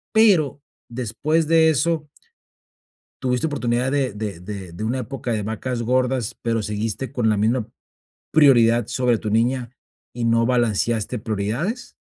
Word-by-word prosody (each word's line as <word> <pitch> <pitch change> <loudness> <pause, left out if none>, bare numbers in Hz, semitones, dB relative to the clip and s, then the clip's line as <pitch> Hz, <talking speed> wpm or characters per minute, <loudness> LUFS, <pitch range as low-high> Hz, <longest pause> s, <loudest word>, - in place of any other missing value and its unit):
pero 175 - +4 0.3
después 130 +7 -1
de 160 0 +5
eso 160 +1 0 1.2
¿tuviste 125 +4 0
oportunidad 125 -3 -1
de 135 -5 0
de 105 -4 -5
de 95 -1 -7
de 90 - -6
una 120 +4 -1
época 125 0 -5
de 110 - -1
vacas 115 +4 -3
gordas 125 0 0
pero 115 -1 0
seguiste 105 +5 -3
con 120 -5 +1
la 105 - +2
misma 110 +2 +1 0.6
prioridad 120 -7 +5
sobre 125 -2 +1
tu 110 - -4
niña 120 +3 0 0.4
y 120 -1 -3
no 115 0 +3
balanceaste 120 -1 0
prioridades? 115 - -3
120 Hz, 140 wpm, -22 LUFS, 110-135 Hz, 1.2 s, de